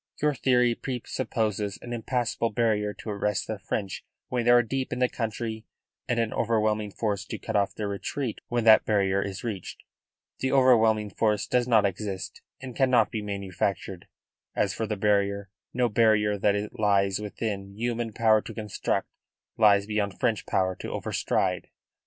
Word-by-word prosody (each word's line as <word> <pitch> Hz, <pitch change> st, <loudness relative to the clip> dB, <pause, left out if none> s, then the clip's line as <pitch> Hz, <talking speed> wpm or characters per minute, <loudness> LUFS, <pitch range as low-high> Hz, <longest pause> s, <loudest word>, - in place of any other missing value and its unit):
Your 150 Hz, 0 st, +2 dB
theory 125 Hz, -2 st, +3 dB
presupposes 115 Hz, -5 st, -2 dB
an 120 Hz, -, -6 dB
impassable 120 Hz, 0 st, -1 dB
barrier 105 Hz, -2 st, +1 dB
to 105 Hz, -, -7 dB
arrest 105 Hz, 0 st, -1 dB
the 110 Hz, -2 st, -5 dB
French 95 Hz, +1 st, -4 dB, 0.3 s
when 125 Hz, -2 st, -1 dB
they -, -, +3 dB
are 120 Hz, 0 st, +7 dB
deep 130 Hz, +3 st, -3 dB
in -, -, -2 dB
the 125 Hz, 0 st, +3 dB
country 110 Hz, -1 st, -4 dB, 0.4 s
and 120 Hz, -, 0 dB
an 115 Hz, -1 st, 0 dB
overwhelming 110 Hz, -2 st, +1 dB
force 100 Hz, -1 st, -2 dB
to -, -, -5 dB
cut 110 Hz, -, -5 dB
off 100 Hz, -1 st, +1 dB
their 105 Hz, -, -3 dB
retreat 115 Hz, +5 st, -4 dB
when 120 Hz, -1 st, 0 dB
that 110 Hz, -1 st, +7 dB
barrier 100 Hz, -2 st, +2 dB
is 100 Hz, -1 st, -5 dB
reached. 105 Hz, -6 st, -6 dB, 0.6 s
The 130 Hz, -, 0 dB
overwhelming 110 Hz, -5 st, +4 dB
force 105 Hz, 0 st, +1 dB
does 125 Hz, -1 st, +1 dB
not 110 Hz, -4 st, +4 dB
exist 95 Hz, 0 st, -4 dB, 0.2 s
and 130 Hz, -3 st, -8 dB
cannot 130 Hz, -3 st, +3 dB
be 110 Hz, -, -3 dB
manufactured; 100 Hz, -2 st, -3 dB, 0.5 s
as 100 Hz, -2 st, +1 dB
for 110 Hz, -, -3 dB
the 105 Hz, -, -2 dB
barrier, 100 Hz, -1 st, +1 dB, 0.2 s
no 125 Hz, -1 st, +1 dB
barrier 105 Hz, -2 st, +3 dB
that 100 Hz, 0 st, +2 dB
it 105 Hz, +1 st, -4 dB
lies 100 Hz, -2 st, +2 dB
within 100 Hz, -2 st, -4 dB
human 120 Hz, 0 st, -2 dB
power 110 Hz, 0 st, +3 dB
to -, -, -9 dB
construct 105 Hz, -3 st, -2 dB, 0.5 s
lies 100 Hz, -2 st, +5 dB
beyond 105 Hz, -2 st, -2 dB
French 110 Hz, -3 st, 0 dB
power 95 Hz, -1 st, +1 dB
to -, -, -6 dB
over -, -, -4 dB
stride." 90 Hz, -2 st, 0 dB
110 Hz, 170 wpm, -27 LUFS, 100-120 Hz, 0.6 s, are